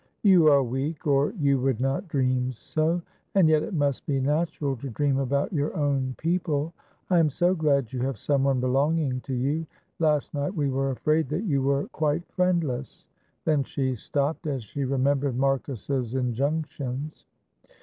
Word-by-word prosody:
"You 185 -6 +6
are 140 -2 +6
weak, 135 +7 -3
or 140 -1 +3
you 140 - +2
would 130 -3 0
not 135 +8 -1
dream 130 -3 0
so, 160 +7 -1 0.3
and 190 -4 +6
yet 155 -1 +4
it 200 +3 -4
must 145 -3 0
be 140 -2 +1
natural 145 0 0
to 135 +4 -6
dream 135 +3 0
about 140 +5 0
your 145 -1 -1
own 135 -3 0
people. 165 -2 -1 0.4
I 175 - +5
am 160 -2 +4
so 175 +6 +2
glad 140 -8 +1
you 130 - -2
have 130 -1 -1
someone 135 +2 +1
belonging 135 +1 +1
to 135 -1 -4
you; 145 +6 -1 0.3
last 150 -3 +1
night 145 +6 -2
we 145 -4 0
were 135 +1 0
afraid 155 +3 +1
that 155 +7 -2
you 145 -10 +1
were 140 +1 +1
quite 155 +3 -1
friendless," 165 -9 -1 0.4
then 150 -3 +2
she 130 0 -2
stopped 145 +7 -2
as 135 -5 -2
she 140 +6 -4
remembered 135 0 +1
Marcus's 135 -2 -1
injunctions. 140 +2 -2
140 Hz, 165 wpm, -26 LUFS, 130-155 Hz, 0.4 s, You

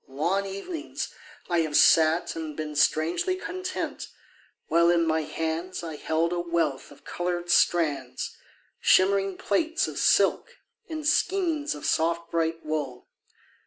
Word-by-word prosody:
Long 170 +9 -1
evenings 300 - -6 0.3
I 175 -1 +1
have 155 -2 +1
sat 160 +2 +4
and 160 -2 -6
been 155 -1 -5
Strangely 165 - +1
content, 370 0 -5 0.6
while 170 +1 +4
in 170 -1 +3
my 160 0 +1
hands 165 +4 -4
I 160 -2 -5
held 160 +3 0
a 175 - -1
wealth 170 -5 -1
of 145 - -17
coloured 175 0 -3
strands, 145 -8 +1 0.4
Shimmering 195 0 +3
plaits 320 - 0
of - - -5
silk 480 +1 +2 0.3
and 310 -2 -5
skeins 330 -2 +1
Of 145 - -8
soft 170 +1 0
bright 165 -1 -1
wool. 145 -5 -4
170 Hz, 130 wpm, -26 LUFS, 160-195 Hz, 0.6 s, sat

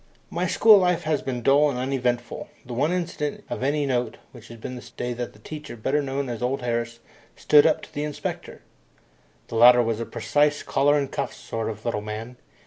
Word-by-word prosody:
My - - -1
school 215 -3 +7
life 180 -2 +1
had 155 -2 0
been 125 -3 -3
dull 145 +3 +5
and 130 - -3
uneventful. 125 -2 -2 0.2
The 125 - -7
one 145 +7 +1
incident 170 -5 -3
of - - -3
any 145 +2 +1
note 125 -4 -1 0.3
had 115 -1 -11
been 125 +3 -6
the 120 -1 -10
day 120 0 -2
that 120 0 -5
the - - -18
teacher, 150 +5 -8
better 135 +7 0
known 140 0 -3
as 120 -2 -5
old 130 +2 -1
Harris, 115 -1 -2 0.3
"stood 150 0 +5
up" 160 - +1
to - - -13
the 145 - -3
inspector. 150 -1 -5 0.9
The - - -6
latter 120 +1 +8
was 115 -1 -1
a 115 - -3
precise, 145 0 +1
collar 145 +1 +2
and 140 -2 -2
cuffs - - -3
sort 115 -1 -4
of 110 - -8
little 115 -3 -1
man. 110 +3 -7
125 Hz, 205 wpm, -24 LUFS, 120-145 Hz, 0.9 s, latter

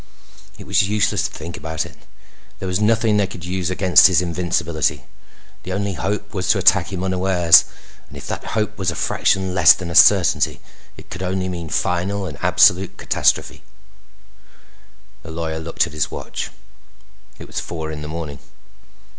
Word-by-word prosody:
It - - -11
was 100 +1 +2
useless 105 0 0
to - - -17
think 85 +3 -8
about 80 0 -4
it. - - -13 0.6
There 95 - -6
was 90 +1 -1
nothing 110 0 +2
they 100 -2 +1
could 90 -3 -10
use 90 -1 -2
against 90 -1 +5
his 95 -3 +2
invincibility. 85 -2 -1 0.6
The 95 - -6
only 100 0 -2
hope 100 +4 -4
was 95 -2 -3
to 110 - +4
attack 95 -1 +3
him 95 -1 -4
unawares... 95 -2 +4 0.4
and - - -11
if - - -10
that - - -5
hope 110 0 -2
was 95 -2 0
a 85 - -3
fraction 95 -1 0
less 95 - +7
than 90 -2 -7
a - - -5
certainty - - +4 0.4
it - - -15
could 90 - -7
only 95 0 -2
mean 85 -3 -6
final 95 +5 -1
and 80 -7 -8
absolute 95 +1 +3
catastrophe. - - 0 1.6
The 80 - -12
lawyer 80 -1 -4
looked 80 +2 -1
at 80 - -10
his 75 -2 -1
watch. - - -6 0.9
It - - -10
was - - -5
four 80 -2 -6
in 75 -1 -7
the 75 - -7
morning. 75 -3 -6
90 Hz, 170 wpm, -20 LUFS, 85-95 Hz, 1.6 s, less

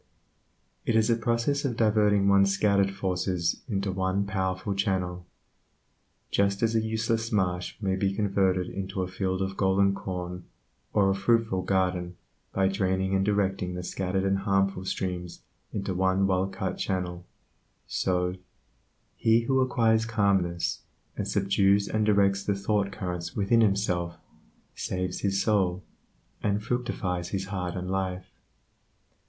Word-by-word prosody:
It 115 - 0
is 110 +1 +4
a - - +4
process 115 +5 0
of 125 -5 -1
diverting 105 -2 +3
one's 100 0 +5
scattered 100 -1 +3
forces 90 -3 -1
into 100 -2 -1
one 95 +1 0
powerful 95 0 -2
channel. 90 -3 -1 1.0
Just 100 +1 +1
as 115 0 +2
a 110 - +3
useless 110 +1 -1
marsh 90 -4 0
may 95 -3 0
be 95 0 +1
converted 95 -3 +1
into 95 -1 -3
a - - -3
field 95 0 -2
of 95 0 -4
golden 95 0 +3
corn 90 -2 -5 0.5
or 100 -2 +3
a - - +2
fruitful 100 -1 +1
garden 90 -1 0 0.3
by 95 0 +2
draining 95 -1 0
and 95 0 +2
directing 95 -3 0
the 90 - -4
scattered 95 +1 -2
and 95 0 +1
harmful 95 -1 +1
streams 90 -2 -4 0.3
into 100 -2 -3
one 95 +1 +2
wellcut 95 0 -1
channel, 90 -2 -2 0.6
so, 90 -1 0 0.8
he 115 0 +3
who 130 +3 +1
acquires 115 -3 +2
calmness, 95 -6 +1 0.3
and 100 - -3
subdues 100 0 +2
and 110 -1 0
directs 100 -1 +3
the 100 - +1
thoughtcurrents 100 -3 -2
within 105 +3 +3
himself, 90 -5 +1 0.6
saves 90 -1 -3
his 100 -1 0
soul, 95 -4 +1 0.6
and 105 0 0
fructifies 105 -8 -2
his 95 0 -2
heart 90 -3 -3
and 90 0 -4
life. 95 -1 -3
95 Hz, 135 wpm, -27 LUFS, 95-105 Hz, 1.0 s, one's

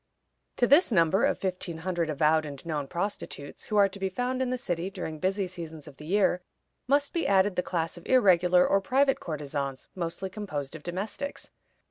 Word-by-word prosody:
To 245 - +4
this 285 +4 +5
number 170 -1 +4
of - - +1
fifteen 185 -3 -3
hundred 170 -1 -2
avowed 155 +2 +3
and 145 -1 -8
known 150 -4 -2
prostitutes, 170 -4 -5
who 210 - -1
are 200 -1 +7
to 195 +1 -10
be 190 0 -1
found 250 +6 -2
in 255 - 0
the 255 - -1
city 175 -5 -2
during 170 -5 -6
busy 190 +3 0
seasons 165 -4 -8
of 140 -2 -12
the 150 - -10
year, 190 -1 +2 0.5
must 285 +1 +2
be 335 - 0
added 195 0 +3
the 180 - +2
class 165 -2 -2
of 175 - -12
irregular 180 -7 +5
or 195 - +3
private 270 +6 +2
courtesans, 140 -4 -4
mostly 180 +2 -4
composed 155 -9 -5
of 155 - -8
domestics. 195 - -5
180 Hz, 190 wpm, -28 LUFS, 160-205 Hz, 0.5 s, are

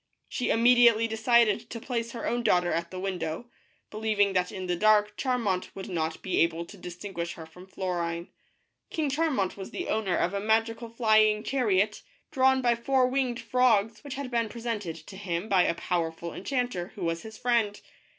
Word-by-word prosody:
She 250 - -2
imme 235 +2 +5
diately 230 -2 +5
decided 225 0 +2
to 230 - -6
place 230 -1 -3
her 235 - -5
own 240 +1 0
daughter 180 -6 +2
at 170 0 -2
the 185 - -7
window, 185 +3 -4 0.4
believing 210 -2 +1
that 180 -1 +1
in 190 -2 -5
the 180 -1 0
dark 210 +2 +3
Charmant 230 -8 -1
would 190 - -7
not 160 -3 -3
be 185 - 0
able 165 0 +1
to 205 - -12
distinguish 175 -1 -6
her 160 - -9
from 180 +4 -14
Florine. 185 -2 -3
THE 170 0 -1
BLUE 170 0 -7
BIRD. - - -20
King 310 -3 0
Char 320 +4 +1
mant 200 -11 -1
was 195 - -7
the 360 - -5
owner 210 -5 0
of 175 - 0
a 200 - -1
mag 220 +2 +3
ical 230 0 -8
flying 215 -2 +3
char 255 -1 -1
iot, 205 +2 +2 0.3
drawn 265 0 +3
by 240 -1 +4
four 255 +2 +2
winged 255 -2 0
frogs, 225 -3 +2
which 285 -2 -6
had 275 -2 -5
been 230 -2 0
presented 225 -7 -4
to 165 +4 -12
him 180 -1 -3
by 190 -4 +4
a - - +1
powerful 170 -1 -2
enchanter 245 -6 -3
who 195 - -6
was 165 0 -1
his 220 +2 -10
friend. 235 -4 +1
215 Hz, 205 wpm, -28 LUFS, 180-235 Hz, 0.4 s, imme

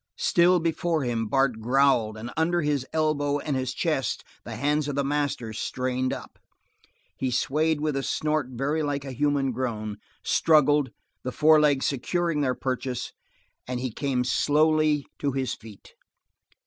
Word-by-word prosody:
Still 175 +1 +4
before 165 -1 0
him 115 -3 -1
Bart 135 -1 +1
growled 120 -3 +2
and 115 +3 -7
under 170 +2 +1
his 145 -3 0
elbow 150 -2 +1
and 145 -1 -3
his 130 -1 -1
chest 135 -4 -1 0.2
the 115 - -7
hands 145 +4 0
of 145 - -3
the 140 - +1
master 140 -5 -1
strained 130 +3 -2
up. - - -7 0.8
He 130 - -1
swayed 155 +5 +1
with 155 -2 0
a 135 - 0
snort 150 +1 -1
very 135 +5 -1
like 145 -2 -2
a 135 - -5
human 140 0 +1
groan, 110 -4 -3 0.2
struggled, 150 -3 +3 0.3
the 125 - -3
forelegs 150 -2 +4
secured 165 +3 0
their 130 -3 +1
purchase, 130 -1 -3 0.5
and 125 -1 -3
he 130 -1 -3
came 130 0 -1
slowly 150 +2 +2
to 140 -2 -1
his 130 -1 -1
feet. 110 -2 -13
140 Hz, 150 wpm, -26 LUFS, 125-150 Hz, 0.8 s, Still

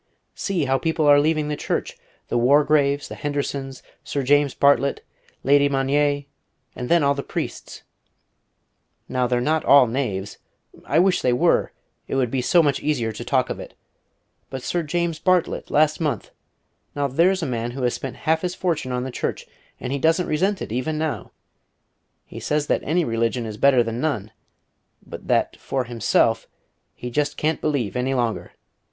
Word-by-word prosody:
"See 180 -7 -1
how 135 0 +1
people 160 +1 0
are 145 0 +7
leaving 155 0 +1
the 150 - -2
Church! - - -3 0.3
The - - 0
Wargraves, 145 +2 +3
the - - -8
Hendersons, 140 -2 -4 0.2
Sir 140 - -3
James 145 +1 +3
Bartlet, 140 0 +3 0.4
Lady 140 +1 +4
Magnier, 145 +1 +1 0.5
and 125 -1 -5
then 170 -2 +4
all 140 0 +3
the 140 - -4
priests. - - -6 1.2
Now 125 -1 0
they're 125 0 +1
not 155 +5 +1
all 140 -2 +7
knaves 115 -6 -3 0.5
I 145 - 0
wish 185 +2 +3
they 125 - +2
were; 120 - +2 0.4
it - - -3
would 125 -3 +1
be 130 - 0
so 170 +7 +4
much 145 -3 +1
easier 130 -7 -1
to 110 - -7
talk - - +1
of - - -5
it. - - -10 0.7
But 130 -1 -6
Sir 175 - -1
James 170 0 -2
Bartlet, 185 0 +1
last 155 +1 +2
month! 145 - -2 0.6
Now, 145 -1 0
there's 170 +7 +2
a - - 0
man 120 -2 -2
who 130 +2 -5
has 125 - +1
spent 135 - -5
half 160 0 0
his 180 -1 -3
fortune 160 -8 -2
on 125 0 -1
the 130 - -5
Church, - - -3 0.3
and 130 - -4
he 140 - -1
doesn't 165 +4 +2
resent 190 +6 0
it - - -8
even 130 +6 -2
now. 155 -1 -3 1.0
He - - -9
says 150 0 -1
that - - 0
any 170 +3 +1
religion 115 0 -1
is 110 -1 -6
better 130 0 +4
than 115 +1 -4
none, 110 -10 -2 0.7
but - - -10
that, - - +1
for 135 -1 -2
himself, 115 -1 +1 0.5
he 125 - -7
just 145 +3 -1
can't 155 +1 0
believe 140 -9 -1
any 130 +2 0
longer. 120 -3 -2
140 Hz, 175 wpm, -23 LUFS, 125-155 Hz, 1.2 s, are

